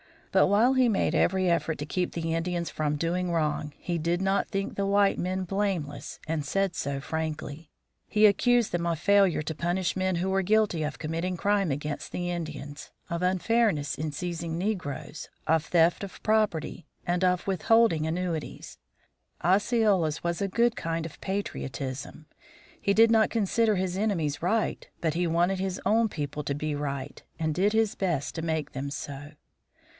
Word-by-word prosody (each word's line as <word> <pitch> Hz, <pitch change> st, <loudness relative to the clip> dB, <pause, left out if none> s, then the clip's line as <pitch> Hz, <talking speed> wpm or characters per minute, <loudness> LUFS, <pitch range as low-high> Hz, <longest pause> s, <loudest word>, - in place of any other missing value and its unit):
But -, -, +5 dB
while 220 Hz, +7 st, +4 dB
he 260 Hz, -1 st, +4 dB
made 205 Hz, -, +1 dB
every 185 Hz, 0 st, +2 dB
effort 165 Hz, -1 st, 0 dB
to 145 Hz, -, -3 dB
keep 180 Hz, +4 st, -2 dB
the 165 Hz, -1 st, -2 dB
Indians 170 Hz, +1 st, -1 dB
from 150 Hz, -1 st, -1 dB
doing 175 Hz, +3 st, -1 dB
wrong, 150 Hz, -2 st, -1 dB
he 175 Hz, -1 st, -3 dB
did 170 Hz, +2 st, 0 dB
not 195 Hz, +1 st, +1 dB
think 195 Hz, 0 st, -3 dB
the 200 Hz, -, 0 dB
white 200 Hz, 0 st, +3 dB
men 185 Hz, +1 st, -1 dB
blameless 185 Hz, -6 st, -3 dB
and 155 Hz, -1 st, -2 dB
said 195 Hz, +5 st, 0 dB
so 140 Hz, -3 st, -3 dB
frankly. 160 Hz, 0 st, -4 dB, 0.4 s
He 215 Hz, 0 st, +4 dB
accused 240 Hz, +3 st, +4 dB
them 170 Hz, -1 st, -1 dB
of 170 Hz, -1 st, 0 dB
failure 195 Hz, -2 st, +3 dB
to 160 Hz, -, -3 dB
punish 175 Hz, +1 st, -1 dB
men 185 Hz, -1 st, 0 dB
who 180 Hz, +3 st, -1 dB
were 195 Hz, 0 st, +2 dB
guilty 205 Hz, -3 st, +2 dB
of 150 Hz, 0 st, -3 dB
committing 165 Hz, +3 st, -2 dB
crimes 200 Hz, -5 st, +1 dB
against 145 Hz, +1 st, -5 dB
the 175 Hz, 0 st, -2 dB
Indians, 150 Hz, -4 st, -6 dB, 0.2 s
of 170 Hz, 0 st, -2 dB
unfairness 185 Hz, -3 st, +1 dB
in 155 Hz, 0 st, -3 dB
seizing 170 Hz, 0 st, -4 dB
negroes, 170 Hz, -6 st, -4 dB, 0.2 s
of 160 Hz, 0 st, +2 dB
theft 170 Hz, +2 st, +3 dB
of 195 Hz, -, -9 dB
property, 210 Hz, -7 st, 0 dB, 0.2 s
and 175 Hz, +1 st, 0 dB
of 180 Hz, -1 st, +1 dB
withholding 195 Hz, -3 st, +3 dB
annuities. 165 Hz, -2 st, -4 dB, 0.6 s
Osceola's 195 Hz, -4 st, +2 dB
was 170 Hz, +2 st, -1 dB
a 200 Hz, -, +1 dB
good 235 Hz, +4 st, +2 dB
kind 165 Hz, -3 st, -2 dB
of 165 Hz, -, -10 dB
patriotism 140 Hz, -7 st, -4 dB, 0.6 s
he 200 Hz, -, +2 dB
did 225 Hz, +2 st, +6 dB
not 220 Hz, -1 st, +4 dB
consider 225 Hz, 0 st, +2 dB
his 185 Hz, -1 st, -1 dB
enemies 165 Hz, -9 st, 0 dB
right, 215 Hz, +6 st, 0 dB
but 160 Hz, -3 st, +1 dB
he 175 Hz, +1 st, 0 dB
wanted 175 Hz, +3 st, +1 dB
his 190 Hz, 0 st, -2 dB
own 225 Hz, +1 st, +3 dB
people 150 Hz, -3 st, -4 dB
to 140 Hz, -, -1 dB
be 150 Hz, +1 st, -2 dB
right, 140 Hz, -1 st, -4 dB, 0.2 s
and 160 Hz, -1 st, -1 dB
did 195 Hz, +6 st, +2 dB
his 220 Hz, -2 st, +2 dB
best 170 Hz, -8 st, -1 dB
to 165 Hz, -, -4 dB
make 160 Hz, -3 st, -2 dB
them 140 Hz, +1 st, -4 dB
so. 145 Hz, 0 st, -7 dB
175 Hz, 170 wpm, -28 LUFS, 155-195 Hz, 0.6 s, did